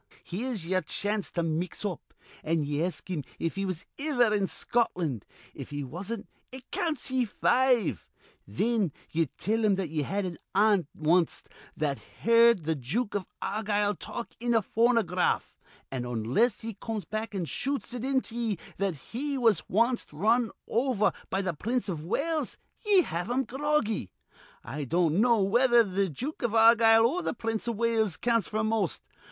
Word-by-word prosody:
Here's 215 0 -3
yer 185 +2 +1
chance 205 +5 -2
to 170 - -2
mix 165 +5 -2
up, 185 -6 -5 0.3
an' 160 0 +1
ye 145 +2 -1
ask 180 0 -4
him 175 -6 -3
if 165 - -2
he 195 0 -2
was 185 -3 -4
iver 250 -7 +2
in 200 -2 +1
Scotland. 175 - -1 0.3
If - - -8
he 145 0 -4
wasn't, 195 - -5 0.2
it 260 0 -11
counts 325 -8 0
ye 260 -1 +2
five. 225 - +2 0.4
Thin 205 - 0 0.2
ye 165 -1 +1
tell 220 +4 0
him 205 -2 +4
that 190 -4 -2
ye 155 0 -1
had 195 +7 -1
an 175 -2 -5 0.2
aunt 205 -5 +4
wanst 165 +2 +1 0.3
that 145 -3 -1 0.2
heerd 230 -6 +5
th' 160 -3 -1
Jook 200 - -1
iv 200 -3 -2 0.2
Argyle 210 0 0
talk 235 +4 -6
in 240 0 +1
a 225 - +3
phonograph; 225 -6 +1 0.4
an', 130 -2 -3
onless 125 - +1
he 225 0 -5
comes 210 -1 -5
back 215 +2 -4
an' 185 -3 -1
shoots 275 - -3
it 245 -1 -4
into 265 -3 0
ye 230 -4 -1 0.2
that 195 -3 0 0.2
he 280 +4 -2
was 225 -8 +2
wanst 235 +5 +1
run 220 +9 +2 0.2
over 235 -3 +2 0.2
be 195 +1 0
th' 175 -5 -3
Prince 235 0 -1
iv 160 -5 -3
Wales, 305 - -1 0.3
ye 405 -4 +5
have 175 - -3
him 255 +2 +1
groggy. 265 - -1 0.5
I 145 +5 -5
don't 165 - +2
know 230 -4 +4
whether 240 +4 +5
th' 195 -2 -1
Jook 270 - -5
iv 235 -3 0
Argyle 225 0 +7
or 325 +10 +1
th' 285 - -3
Prince 225 0 -2
iv 235 - -1
Wales 220 -5 +1
counts 230 -4 +1
f'r 215 0 0
most. 220 -5 0
215 Hz, 170 wpm, -28 LUFS, 175-235 Hz, 0.5 s, Argyle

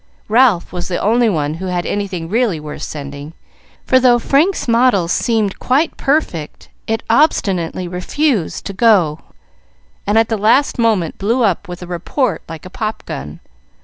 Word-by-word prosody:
Ralph 225 -7 +3
was 175 -1 -4
the 180 - -2
only 230 +2 +2
one 150 -5 -1
who 185 +4 -6
had 180 -1 -2
anything 185 -5 -3
really 215 -3 0
worth 150 0 -8
sending; 145 +1 -7 0.5
for 260 - +4
though 245 -1 +5
Frank's 290 +10 +1
model 230 -6 +3
seemed 215 +2 0
quite 285 +6 +1
perfect, 270 - -2 0.2
it 225 0 -1
obstinately 195 - +1
refused 185 - -1
to 200 - -5
go, 190 -8 +3 0.9
and 205 +2 +2
at 225 0 +4
the 225 - -1
last 230 +7 +2
moment 215 -8 +1
blew 230 +5 +1
up 200 -1 0
with 180 0 -8
a - - -6
report 180 - -2
like 165 0 -8
a - - -8
pop 215 +2 -4
gun. 75 +2 -7
200 Hz, 160 wpm, -17 LUFS, 175-235 Hz, 0.9 s, though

